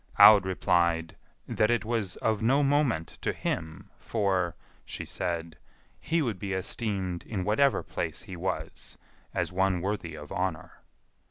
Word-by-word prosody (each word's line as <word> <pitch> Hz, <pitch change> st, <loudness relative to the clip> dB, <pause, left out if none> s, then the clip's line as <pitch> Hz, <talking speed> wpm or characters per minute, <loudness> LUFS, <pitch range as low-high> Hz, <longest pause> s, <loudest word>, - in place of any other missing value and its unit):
Aud 100 Hz, -3 st, +9 dB
replied, 85 Hz, -3 st, +1 dB, 0.3 s
"That 110 Hz, -, +2 dB
it 120 Hz, -1 st, +1 dB
was 110 Hz, -5 st, -1 dB
of 110 Hz, -2 st, 0 dB
no 135 Hz, +6 st, +3 dB
moment 135 Hz, -, +1 dB
to -, -, 0 dB
him, 85 Hz, +5 st, -4 dB
for," 95 Hz, -6 st, 0 dB, 0.3 s
she -, -, -6 dB
said, 85 Hz, -3 st, -3 dB, 0.4 s
"he 165 Hz, 0 st, 0 dB
would 110 Hz, -8 st, -2 dB
be 100 Hz, 0 st, -3 dB
esteemed 95 Hz, -2 st, -2 dB
in 100 Hz, -4 st, -4 dB
whatever 115 Hz, +7 st, +3 dB
place -, -, -3 dB
he 95 Hz, -, -8 dB
was, 90 Hz, +1 st, -4 dB, 0.3 s
as -, -, -1 dB
one 95 Hz, 0 st, +2 dB
worthy 90 Hz, -3 st, -3 dB
of 75 Hz, -1 st, -10 dB
honour." 90 Hz, -3 st, -3 dB
95 Hz, 145 wpm, -28 LUFS, 85-110 Hz, 0.4 s, Aud